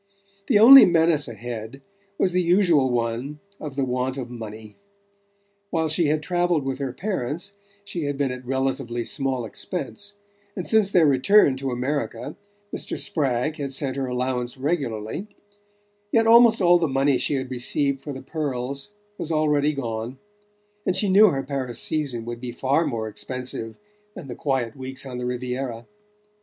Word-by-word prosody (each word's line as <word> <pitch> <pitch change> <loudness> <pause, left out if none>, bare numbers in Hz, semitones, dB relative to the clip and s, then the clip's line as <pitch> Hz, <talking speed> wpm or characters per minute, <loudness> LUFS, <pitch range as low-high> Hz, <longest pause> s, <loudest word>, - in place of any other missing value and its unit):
The 230 - +4
only 260 +6 +11
menace 165 -4 +3
ahead 115 +2 -7 0.4
was 185 - +2
the 180 +1 +2
usual 170 -6 +3
one 120 +4 -2 0.2
of 145 -3 -7
the 135 -1 0
want 130 +1 -2
of 125 -2 -6
money. 110 -2 -9 0.9
While 160 -3 0
she 160 +1 +2
had 155 +1 0
travelled 175 -3 +1
with 135 0 -3
her 135 -2 -2
parents 175 - -3 0.3
she 175 -6 -4
had 145 -1 -2
been 140 -2 0
at 125 0 -7
relatively 130 -2 -2
small 130 -1 -1
expense, 205 - -5 0.4
and 185 - -5
since 215 -3 +3
their 175 -4 +5
return 140 +3 +5
to 135 0 -3
America 125 -2 -3 0.4
Mr. - - -3
Spragg 150 -3 0
had 140 -3 -4
sent 135 -1 -1
her 135 -1 -2
allowance 125 0 -2
regularly; 135 - -3 0.8
yet 225 -1 +3
almost 225 -2 +6
all 175 0 +6
the 165 - +1
money 135 -1 +2
she 140 - +1
had 130 -1 -4
received 135 +2 0
for 145 - -6
the 130 -1 -8
pearls 140 0 -3 0.3
was 165 - -3
already 150 -1 +2
gone, 120 -2 -4 0.7
and 185 - 0
she 195 +1 +1
knew 205 +3 +7
her 135 -4 -2
Paris 130 -3 -4
season 140 -7 -1
would 120 0 -6
be 125 -1 -5
far 135 +6 +1
more 115 -5 -3
expensive 120 0 -5 0.4
than - - -9
the 125 - -6
quiet 130 -5 -1
weeks 130 0 -5
on 125 -2 -6
the 125 - -3
Riviera. 125 -1 -4
135 Hz, 165 wpm, -24 LUFS, 125-160 Hz, 0.9 s, only